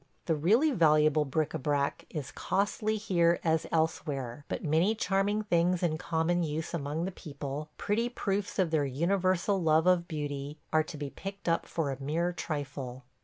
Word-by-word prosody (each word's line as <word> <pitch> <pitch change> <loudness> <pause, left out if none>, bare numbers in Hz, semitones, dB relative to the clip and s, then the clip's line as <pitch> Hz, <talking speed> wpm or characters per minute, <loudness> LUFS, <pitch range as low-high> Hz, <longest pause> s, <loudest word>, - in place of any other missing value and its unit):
The 165 - +2
really 215 - +3
valuable 155 - +4
bric 150 +2 0
à - - -4
brac 140 0 0
is 150 -4 -5
costly 210 +2 0
here 175 -5 +2
as 160 -1 +1
elsewhere; 145 -5 -1
but - - -4
many 165 +8 +2
charming 205 +1 +1
things 175 -2 +2
in 160 -2 +1
common 170 +2 +1
use 160 0 -3
among 155 +1 -2
the 190 - -3
people, 145 -3 -6
pretty 230 +4 0
proofs 200 -4 -2
of 180 -4 +2
their 155 -3 +2
universal 185 +6 +1
love 160 0 +4
of 180 -1 +3
beauty, 145 -2 -4 0.2
are 155 - +5
to 155 -1 -7
be 145 -1 -5
picked 195 0 -8
up 165 0 +1
for 155 -4 -1
a 135 0 -6
mere 165 +5 0
trifle. 135 -6 -5
160 Hz, 170 wpm, -30 LUFS, 150-185 Hz, 0.2 s, are